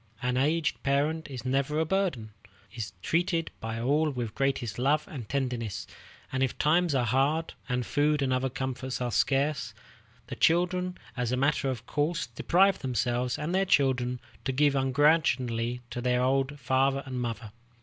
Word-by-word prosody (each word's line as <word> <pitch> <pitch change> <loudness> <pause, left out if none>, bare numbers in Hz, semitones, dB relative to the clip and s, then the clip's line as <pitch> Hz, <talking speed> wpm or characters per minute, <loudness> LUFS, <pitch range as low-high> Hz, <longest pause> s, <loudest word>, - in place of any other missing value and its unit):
An 125 +1 -1
aged 150 +5 +1
parent 150 +3 0
is 130 -3 -7
never 135 +3 0
a 160 - +2
burden, 160 - -1 0.4
is 105 -5 -5
treated 165 -1 0
by 115 0 -4
all 145 +6 +2
with 125 -5 -3
the - - -21
greatest 130 -5 -1
love 150 +4 +2
and 120 -8 -8
tenderness; 125 -7 -2 0.5
and 130 - -1
if 130 -2 0
times 160 0 +3
are 125 -2 +2
hard, 140 +7 +1 0.2
and 125 -1 0
food 150 0 +1
and 130 -1 +1
other 130 +1 0
comforts 130 0 -4
are 125 -1 -2
scarce, 140 +6 +1 0.5
the - - -6
children, 180 +2 +2 0.2
as 125 -2 -1
a 125 - +1
matter 140 0 +1
of 120 -3 -4
course, 150 +6 -1
deprive 190 +2 +2
themselves 125 -1 -1
and 150 +4 -3
their 190 +1 +3
children 130 -7 +2 0.2
to 135 - -1
give 140 +1 +3
ungrudgingly 130 -4 +2
to 120 - -4
their 125 0 +1
old 135 +2 +1
father 135 +1 +1
and 130 -2 -4
mother. 115 -3 -4
135 Hz, 170 wpm, -28 LUFS, 125-150 Hz, 0.5 s, times